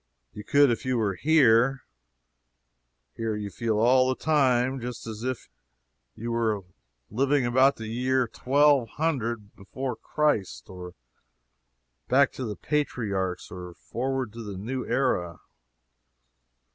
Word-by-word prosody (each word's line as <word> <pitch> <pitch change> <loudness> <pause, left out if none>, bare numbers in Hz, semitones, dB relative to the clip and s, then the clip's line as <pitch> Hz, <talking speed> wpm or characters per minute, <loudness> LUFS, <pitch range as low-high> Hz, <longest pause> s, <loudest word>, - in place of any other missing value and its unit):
You 105 - -8
could 140 +4 +4
if 115 - -2
you 130 -1 0
were 105 -4 0
here. 135 - +3 1.3
Here, 115 -1 -2
you 105 -1 -5
feel 110 +3 -1
all 130 +3 +4
the 130 - 0
time 130 -4 +2
just 120 0 -6
as 110 -1 -7
if 130 0 -4 0.7
you 115 +2 -5
were 110 -4 0 0.5
living 135 +3 +2
about 130 +3 +4
the 110 - -8
year 125 +4 0
1200 130 -3 +1
before 125 +6 -5
Christ 145 -14 -1
or 90 -1 -9 1.1
back 135 +1 +4
to 130 - -5
the 105 -2 -4
patriarchs 100 - -2
or 90 -1 -8
forward 130 +1 -3
to 115 - -8
the 100 -4 -7
New 125 +6 -4
Era. 120 -10 0
120 Hz, 125 wpm, -26 LUFS, 105-130 Hz, 1.3 s, could